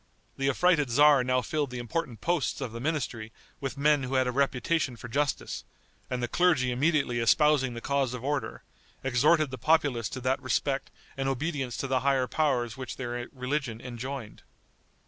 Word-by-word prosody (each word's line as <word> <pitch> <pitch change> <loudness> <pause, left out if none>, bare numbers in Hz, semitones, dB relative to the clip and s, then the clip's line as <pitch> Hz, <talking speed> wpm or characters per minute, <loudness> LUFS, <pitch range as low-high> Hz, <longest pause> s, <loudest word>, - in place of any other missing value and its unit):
The 135 0 0
affrighted 155 0 +3
tzar 145 +1 +6
now 125 0 +1
filled 150 +2 -1
the 125 - -6
important 120 0 -4
posts 175 -4 0
of 120 - -4
the 115 - -6
ministry 120 -6 -2 0.3
with 135 0 -4
men 145 0 +3
who 130 +1 -3
had 130 0 +3
a 125 - 0
reputation 135 +1 0
for 120 - -9
justice, 145 +3 -2 0.5
and 125 -1 -2
the - - +1
clergy 150 -4 +2
immediately 135 -2 +1
espousing 135 +1 +3
the 120 - -6
cause 135 -2 0
of 125 - -8
order, 145 0 -2 0.4
exhorted 135 +4 +3
the 130 - -6
populace 140 -6 +2
to 130 - -6
that 130 +1 0
respect 135 +2 -1 0.3
and 135 0 0
obedience 135 -2 -2
to - - -2
the 130 -1 +1
higher 135 0 +2
powers 125 -6 0
which 130 -3 -6
their 120 -1 -4
religion 130 -3 -3
enjoined. 125 -1 -7
130 Hz, 175 wpm, -28 LUFS, 125-145 Hz, 0.5 s, tzar